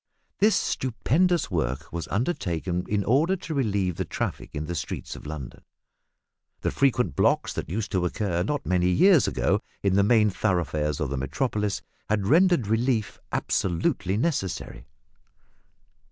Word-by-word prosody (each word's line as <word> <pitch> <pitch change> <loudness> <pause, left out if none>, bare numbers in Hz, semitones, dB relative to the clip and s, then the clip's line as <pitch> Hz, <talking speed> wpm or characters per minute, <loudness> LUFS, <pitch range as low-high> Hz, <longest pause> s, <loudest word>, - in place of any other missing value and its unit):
This 210 0 +4
stupendous 160 - +1
work 75 -2 -2
was 85 -1 -4
undertaken 90 - -1
in 100 -1 +1
order 150 - +3
to 170 -3 -6
relieve 100 - 0
the - - 0
traffic - - -4
in 75 +1 -3
the 85 - -4
streets 85 - -5
of - - -10
London. 75 -5 -7 1.0
The - - 0
frequent 125 - +1
blocks - - +2
that - - -5
used 105 +4 -3
to 95 -4 +1
occur 90 -1 -1
not 145 +10 -2
many 90 -1 +2
years 175 - +5
ago - - +1 0.2
in 100 -2 +2
the 100 +1 +4
main 105 -1 +4
thoroughfares 80 -7 0
of 75 -3 -2
the 70 - -2
Metropolis, 105 - -1 0.3
had 105 -2 +1
rendered 170 - +4
relief 110 +1 0
absolutely 95 +2 0
necessary. 120 - -2
100 Hz, 145 wpm, -26 LUFS, 85-130 Hz, 1.0 s, years